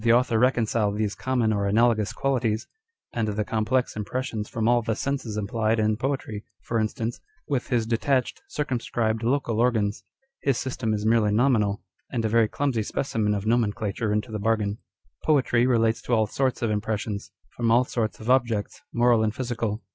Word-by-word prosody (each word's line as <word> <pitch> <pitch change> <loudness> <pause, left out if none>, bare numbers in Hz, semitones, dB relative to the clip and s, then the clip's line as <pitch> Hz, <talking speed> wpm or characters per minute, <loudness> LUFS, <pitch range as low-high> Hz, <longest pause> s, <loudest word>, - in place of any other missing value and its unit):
author 120 -1 +3
reconcile 115 -4 +2
these 105 0 -1
common 125 -4 0
or 100 -1 0
analogous 110 0 +3
qualities, 120 -5 0 0.5
and 115 -2 0
the 105 0 -1
complex 115 +4 0
impressions 110 0 -3
from 115 -1 -1
all 120 0 +4
the 110 -1 -1
senses 130 -4 -3
implied 110 +2 0
in 110 0 +2
poetry 120 -4 -3 0.2
(for 115 - -1
instance) 110 +2 -2 0.3
with 135 -4 -1
his 120 -3 +1
detached, 125 +3 0
circumscribed, 120 -5 -1
local 120 -2 0
organs? 110 -4 +1 0.4
His 135 -4 +1
system 120 -4 -2
is 105 0 -3
merely 110 -2 +3
nominal, 105 -3 +2 0.3
and 115 -3 -1
a - - +1
very 115 0 +4
clumsy 130 -1 -1
specimen 105 -2 -1
of 100 0 -3
nomenclature 110 -2 0
into 105 +1 -1
the 110 - -3
bargain. 105 -1 0
â€" - - -43
Poetry 130 -5 +3
relates 115 -2 +2
to 120 - +1
all 110 -1 +3
sorts 130 +3 -1
of 115 - +1
impressions, 105 -1 -2 0.3
from 115 -1 0
all 120 +2 +5
sorts 110 -6 -2
of 110 - -9
objects, 120 -5 +1
moral 120 -1 +4
and 110 0 0
physical. 120 -4 -3
115 Hz, 170 wpm, -25 LUFS, 105-120 Hz, 0.5 s, all